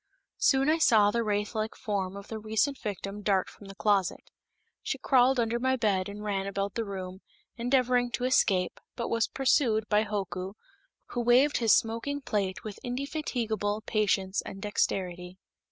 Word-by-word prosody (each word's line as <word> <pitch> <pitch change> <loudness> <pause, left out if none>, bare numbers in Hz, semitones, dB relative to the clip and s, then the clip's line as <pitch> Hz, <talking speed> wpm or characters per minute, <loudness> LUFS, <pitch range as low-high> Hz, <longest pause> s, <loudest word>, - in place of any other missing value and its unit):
Soon, 270 0 +3
I 315 +2 +3
saw 210 -8 +5
the 235 +1 0
wraith 210 0 -1
like 220 0 -2
form 200 -4 -3
of 200 - -10
the 220 - -5
recent 220 +6 0
victim 200 0 -5
dart 195 -2 +1
from 200 - -13
the 195 - -10
closet. 200 -2 0 0.5
She - - -3
crawled 255 -1 +3
under 235 0 0
my 260 +1 +2
bed 200 -6 0
and 205 +1 -8
ran 195 -2 -2
about 200 0 -2
the 230 - -2
room, 190 -1 -6 0.3
endeavoring 245 0 +2
to 245 - -2
escape, 195 -8 +2 0.2
but 235 - -3
was 230 -1 +1
pursued 240 -5 +2
by 210 0 +4
Hoku, 190 -3 -4 0.6
who 245 - -2
waved 250 +5 +4
his 225 -3 +4
smoking 230 +6 -2
plate 210 -4 -2
with 215 -3 -7
indefatigable 245 -6 -2
patience 200 -3 +1
and 195 - -8
dexterity. 185 -3 -2
215 Hz, 165 wpm, -29 LUFS, 195-245 Hz, 0.6 s, saw